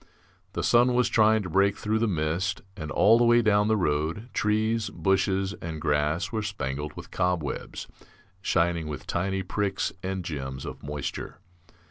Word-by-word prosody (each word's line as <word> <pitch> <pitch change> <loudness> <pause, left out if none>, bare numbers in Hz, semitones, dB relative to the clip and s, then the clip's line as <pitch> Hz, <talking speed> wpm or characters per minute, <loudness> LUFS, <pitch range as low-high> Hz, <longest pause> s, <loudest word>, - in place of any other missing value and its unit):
The - - -2
sun 120 +1 +4
was 125 -1 +3
trying 110 -1 +4
to 90 - -5
break 100 +1 +3
through 110 +1 0
the 115 - +2
mist, 85 +2 -1
and 80 -7 -6
all 115 +8 +5
the - - +4
way 120 0 +5
down 105 -1 +3
the 110 0 +3
road 85 +6 -1
trees, 110 0 +1
bushes, 95 0 +1
and 80 -2 -5
grass 75 +4 0
were 110 -2 -1
spangled 75 -8 -4
with - - -10
cob 90 -3 0
webs, 70 - -5 0.6
shining 85 -3 +1
with 75 -2 -6
tiny 95 +2 -1
pricks 95 +1 -1
and 95 -1 -3
gems 65 -4 -5
of - - -7
moisture. 75 0 -5
95 Hz, 165 wpm, -27 LUFS, 80-105 Hz, 0.6 s, all